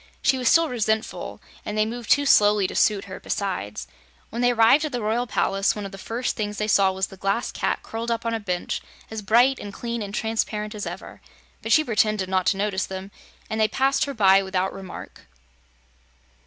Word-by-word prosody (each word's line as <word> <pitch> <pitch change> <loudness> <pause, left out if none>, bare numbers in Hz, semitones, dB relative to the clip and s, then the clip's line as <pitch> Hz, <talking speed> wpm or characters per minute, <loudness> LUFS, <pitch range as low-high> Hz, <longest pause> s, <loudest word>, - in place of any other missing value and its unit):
She 265 -1 +3
was 250 - +2
still 330 0 +5
resentful, 220 -4 -2 0.2
and 210 - -4
they 215 - +3
moved 235 0 -6
too 285 0 +4
slowly 205 -6 +5
to - - -3
suit 205 -2 +2
her, 190 -1 -8
besides. 180 - -3 0.5
When 235 - -3
they 245 - +4
arrived 235 +5 +5
at 305 - -2
the 245 - -2
Royal 230 +3 0
Palace, 195 -2 +1
one 210 -1 -5
of 195 - -7
the 195 - -10
first 235 +5 -3
things 210 -2 -3
they 210 - -1
saw 195 -2 +4
was 190 0 -1
the 195 - -13
Glass 195 +6 -1
Cat - - -2
curled 230 +1 -5
up 230 0 -2
on 230 - 0
a 225 - -1
bench 180 -4 -3 0.3
as 220 -1 -4
bright 240 +6 +4
and 205 - -7
clean 235 +2 -4
and 200 -1 -5
transparent 215 0 -2
as 210 -1 -5
ever. - - -8 0.4
But - - -4
she 310 - +6
pretended 215 -5 +1
not 185 -1 +1
to 195 - +2
notice 195 -2 -1
them, 190 +1 -7 0.4
and 220 0 -2
they 215 - +5
passed 270 +6 +1
her 280 -1 -5
by 195 -3 +5
without 190 -1 -1
remark. 190 -1 -10
215 Hz, 210 wpm, -24 LUFS, 195-235 Hz, 0.5 s, she